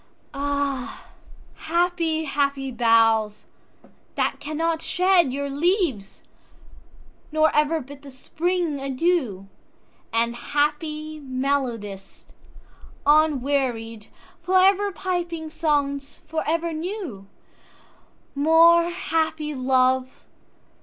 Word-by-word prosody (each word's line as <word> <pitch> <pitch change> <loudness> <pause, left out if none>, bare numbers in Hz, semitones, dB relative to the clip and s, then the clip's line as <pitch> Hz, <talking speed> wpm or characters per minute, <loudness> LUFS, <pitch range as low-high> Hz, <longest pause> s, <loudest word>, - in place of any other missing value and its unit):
3.Ah, 280 -2 -3 0.5
happy, 335 -1 0
happy 280 -2 -1
boughs! 225 -3 +2 0.7
that - - -1
cannot 320 +2 -2
shedYour 340 -7 +1
leaves, 285 - -1 1.1
nor 310 0 +2
ever 300 +2 +2
bid 280 +2 -12
the 285 - -12
Spring 325 +3 -2
adieu; 270 - -1 0.6
And, 235 +1 0
happy 305 +4 -2
melodist, 255 -8 -3 0.8
unwearied, 270 -7 +1 0.3
For 370 +2 +2
ever 390 +2 +4
piping 345 -4 -4
songs 285 -3 -1
for 315 0 -2
ever 335 +1 0
new; 315 - -6 1.1
More 330 +3 +5
happy 315 -3 -2
love! 260 0 +1
290 Hz, 80 wpm, -23 LUFS, 260-330 Hz, 1.1 s, More